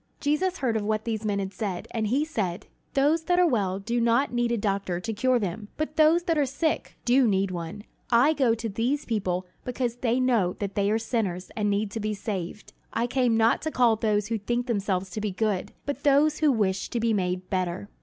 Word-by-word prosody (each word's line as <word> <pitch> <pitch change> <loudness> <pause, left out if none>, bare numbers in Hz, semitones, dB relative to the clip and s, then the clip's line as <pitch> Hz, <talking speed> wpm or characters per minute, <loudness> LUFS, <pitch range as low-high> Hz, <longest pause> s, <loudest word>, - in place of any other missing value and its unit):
Jesus 350 +6 0
heard 240 -4 0
of 220 - +1
what 215 +1 -1
these 225 -2 -2
men 205 -1 0
had 195 0 -3
said, 190 -3 -4
and 220 -2 -1
he 270 +7 +1
said: 210 - -3 0.3
"Those 300 +4 +2
that 355 -1 +2
are 360 - +5
well 200 - +1
do 235 +4 -1
not 235 +4 +2
need 240 -1 +1
a 235 - +1
doctor 195 -4 -1
to 220 +5 -4
cure 255 +4 +2
them, 205 0 -3
but 310 0 -3
those 320 +2 +5
that 330 -3 +1
are 290 - +3
sick 310 +4 -1
do 250 +1 +4
need 195 -2 +1
one. 175 +3 -6 0.3
I 250 +6 +5
go 255 -7 +2
to 230 0 -4
these 240 +8 -1
people 190 -5 -1 0.2
because 245 -1 -2
they 245 0 +1
know 230 -8 +2
that 200 -1 -4
they 200 0 +1
are 215 - +2
sinners 215 -6 -2
and 210 -1 0
need 205 0 0
to 225 - -4
be 215 0 -2
saved. 195 -1 -5 0.2
I 235 - 0
came 245 -2 +2
not 225 +1 +3
to 315 - -2
call 245 -6 +3
those 210 -1 0
who 225 -1 -1
think 240 +4 -1
themselves 195 -5 -1
to 215 - -4
be 210 - -1
good, 195 0 -1
but 285 - -3
those 290 +2 +3
who 305 -2 +4
wish 195 -5 0
to 240 - -2
be 230 0 +1
made 185 -1 -2
better." 185 +1 -2
225 Hz, 225 wpm, -26 LUFS, 200-255 Hz, 0.3 s, are